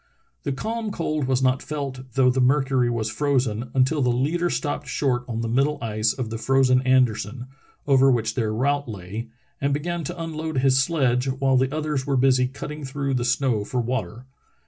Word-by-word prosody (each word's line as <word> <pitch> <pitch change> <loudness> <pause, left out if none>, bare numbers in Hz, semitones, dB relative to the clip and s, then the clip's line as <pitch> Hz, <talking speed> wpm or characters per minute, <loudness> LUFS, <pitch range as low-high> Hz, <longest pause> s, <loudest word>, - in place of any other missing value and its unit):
The 140 - -2
calm 220 +10 -3
cold 155 -6 -2
was 130 0 +1
not 130 0 +2
felt, 140 -4 -5
though 130 0 +4
the 130 +1 0
mercury 130 -1 +2
was 115 -2 -2
frozen, 125 -5 0
until 130 +3 +2
the 125 - +2
leader 155 +9 +1
stopped 145 -3 -2
short 125 -4 0
on 115 -2 -3
the 115 - -2
middle 135 +6 +1
ice 110 -1 0
of 120 -4 -5
the 115 - -4
frozen 130 +1 +3
Anderson, 125 -2 +1 0.4
over 135 -1 +5
which 115 -3 +1
their 115 -4 -1
route 140 +4 0
lay, 105 +3 -6 0.3
and 140 0 +1
began 170 +3 -3
to 175 +4 -6
unload 160 -2 -4
his 135 0 +4
sledge 135 -5 +1
while 135 0 +1
the 130 +1 +2
others 150 -3 -2
were 140 -2 +1
busy 130 -1 +3
cutting 150 +3 -7
through 140 0 -2
the 125 -2 0
snow 125 -3 +1
for 125 +4 -3
water. 120 0 -3
130 Hz, 190 wpm, -24 LUFS, 125-145 Hz, 0.4 s, over